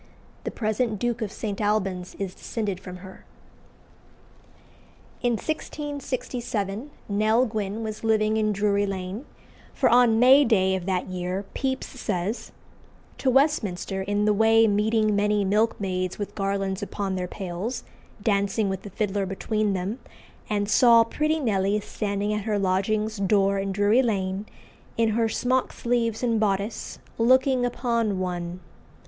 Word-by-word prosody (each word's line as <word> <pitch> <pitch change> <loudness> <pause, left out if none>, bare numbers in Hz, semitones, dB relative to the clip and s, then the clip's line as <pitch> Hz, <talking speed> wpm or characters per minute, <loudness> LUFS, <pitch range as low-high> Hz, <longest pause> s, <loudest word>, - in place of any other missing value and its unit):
The - - -1
present 220 0 -1
Duke 240 +2 -1
of 210 -3 -2
St. 210 -2 -4
Alban's 195 -4 -1
is 195 -2 -4
descended 205 -4 -4
from 180 -1 -9
her. 190 - -12 2.0
In 245 -1 +2
1667 255 -5 -3 0.2
Nell 215 +4 +3
Gwynn 215 -1 -3
was 215 0 -5
living 215 -1 +2
in 215 -1 +1
Drury 205 0 +1
Lane, 195 +5 -5 0.5
for - - +3
on 240 -2 +5
May 265 +4 +7
day 190 -6 +3
of 185 -1 -5
that 185 -2 0
year 185 +2 -3
Pepys 265 -1 -2
says 210 -3 -3 0.7
"To 265 - +1
Westminster, 225 - +1
in 205 +2 0
the 210 - +4
way 225 +2 +5
meeting 215 0 +2
many 205 0 +2
milkmaids 190 -3 0
with 205 - -5
garlands 195 -1 -2
upon 200 -1 -3
their 180 -1 -2
pails, 190 +6 -4 0.4
dancing 200 0 +1
with 190 -1 -4
a 205 - -7
fiddler 200 -1 -1
between 210 +2 -1
them; 195 +6 -3 0.5
and 205 -1 0
saw 230 +1 +6
pretty 305 +7 0
Nelly 205 -5 +1
standing 205 0 -2
at 210 -1 -3
her 215 -2 0
lodging's 210 +3 0
door 195 0 +2
in 195 0 -2
Drury 205 +5 +3
Lane, 195 -3 -1 0.5
in 230 -1 +3
her 225 +1 +1
smock 255 +3 0
sleeves 235 -1 -1
and 230 -2 +2
boddice, 205 +1 -1 0.2
looking 255 +2 +4
upon 235 -4 0
one. 180 -1 -4
210 Hz, 140 wpm, -25 LUFS, 195-230 Hz, 2.0 s, May